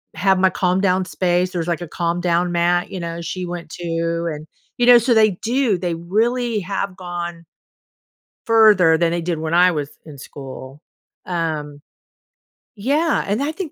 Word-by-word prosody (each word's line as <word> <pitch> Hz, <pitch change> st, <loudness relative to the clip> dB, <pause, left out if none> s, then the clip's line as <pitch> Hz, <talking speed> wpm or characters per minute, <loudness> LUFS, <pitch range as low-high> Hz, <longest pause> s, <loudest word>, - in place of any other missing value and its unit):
have 190 Hz, -1 st, +2 dB
my 190 Hz, 0 st, +4 dB
calm 180 Hz, 0 st, 0 dB
down 185 Hz, -1 st, +2 dB
space." 180 Hz, 0 st, 0 dB
There's 175 Hz, -2 st, -3 dB
like 170 Hz, -1 st, -2 dB
a 175 Hz, -, -5 dB
calm 170 Hz, +1 st, -2 dB
down 175 Hz, 0 st, +1 dB
mat, 175 Hz, +1 st, +1 dB
you 185 Hz, -, -5 dB
know, 170 Hz, 0 st, -5 dB
she 180 Hz, +2 st, -4 dB
went 175 Hz, -2 st, -7 dB
to. 170 Hz, 0 st, -2 dB
And, 150 Hz, +1 st, -9 dB, 0.3 s
you 240 Hz, -, +2 dB
know, 245 Hz, -1 st, +9 dB
so 240 Hz, +1 st, +2 dB
they 215 Hz, -2 st, +5 dB
do, 235 Hz, -3 st, +1 dB
they 175 Hz, -2 st, -2 dB
really 225 Hz, +6 st, 0 dB
have 195 Hz, 0 st, -3 dB
gone 175 Hz, -2 st, -6 dB, 1.0 s
further 210 Hz, -8 st, +5 dB
than 170 Hz, 0 st, +1 dB
they 175 Hz, -, -1 dB
did 170 Hz, -1 st, -2 dB
when 160 Hz, +1 st, -3 dB
I 180 Hz, +1 st, +5 dB
was 145 Hz, -3 st, -3 dB, 0.2 s
in 150 Hz, -3 st, -11 dB
school. 135 Hz, +1 st, -10 dB, 0.4 s
Um, 155 Hz, -5 st, -3 dB, 0.9 s
yeah, 290 Hz, +9 st, +1 dB
and 205 Hz, +5 st, -1 dB
I 295 Hz, +2 st, -1 dB
think 350 Hz, -3 st, -6 dB
175 Hz, 175 wpm, -20 LUFS, 170-200 Hz, 1.0 s, know